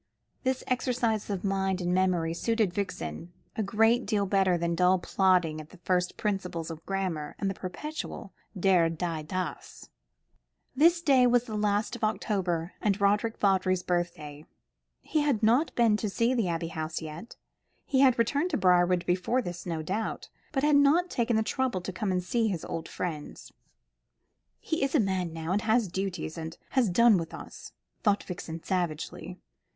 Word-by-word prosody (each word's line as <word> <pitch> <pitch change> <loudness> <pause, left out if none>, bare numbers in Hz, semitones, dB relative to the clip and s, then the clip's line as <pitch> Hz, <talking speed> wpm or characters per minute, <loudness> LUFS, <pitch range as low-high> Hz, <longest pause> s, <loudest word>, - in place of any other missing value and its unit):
This 260 -1 -1
exercise 240 -4 0
of 195 -3 -3
mind 195 -1 0
and 180 0 -1
memory 180 -3 +1
suited 220 +1 0
Vixen 170 - -4 0.2
a - - -1
great 225 +4 +2
deal 205 -2 +1
better 190 -2 +2
than 170 0 -1
dull 180 +2 +4
plodding 180 -4 +2
at 155 - -14
the - - -15
first 180 0 -1
principles 180 -5 -2
of 160 0 -9
grammar, 185 -6 -2
and 195 -1 -1
the - - -4
perpetual 200 - -6 0.3
der, 180 -3 +4
die, 165 -1 -3
das. 180 +1 -5 0.9
This 335 +4 +4
day 265 -5 +5
was 245 -1 +3
the 235 -3 -8
last 210 +2 0
of 240 - -9
October, 190 -5 -1
and 205 -1 +1
Roderick 210 +3 +2
Vawdrey's 185 -2 +2
birthday. 165 -4 -3 0.6
He 310 - -1
had 275 -7 +1
not 245 +9 +3
been 225 -3 +3
seen 230 +3 0
at 260 - 0
the 220 -5 +1
Abbey 165 -1 -2
House 160 -1 -4
yet. 160 +7 -8 0.5
He 265 - +1
had 265 -2 +5
returned 285 +9 +1
to 300 - 0
Briarwood 180 -2 +3
before 185 +8 +1
this, 175 -1 -6
no 165 -2 -3
doubt, 210 +7 -3 0.2
but 270 -2 -1
had 295 -1 +5
not 315 +6 +4
taken 235 -1 +1
the 220 - +2
trouble 255 -3 -1
to 180 +1 -6
come 195 +1 -2
and 180 -1 0
see 225 +5 +1
his 180 -6 -3
old 165 0 -5
friends. 155 -5 -6 1.1
"He's 275 -3 -1
a - - +5
man 190 -5 0
now, 165 +1 -4
and 200 +2 +1
has 220 0 +2
duties, 185 -3 -4
and 160 +1 -6
has 255 -6 +2
done 225 +1 +5
with 165 -1 -6
us," - - -10 0.3
thought 205 -2 +2
Vixen 165 -3 -7
savagely. 175 -1 -3
190 Hz, 170 wpm, -28 LUFS, 175-230 Hz, 1.1 s, day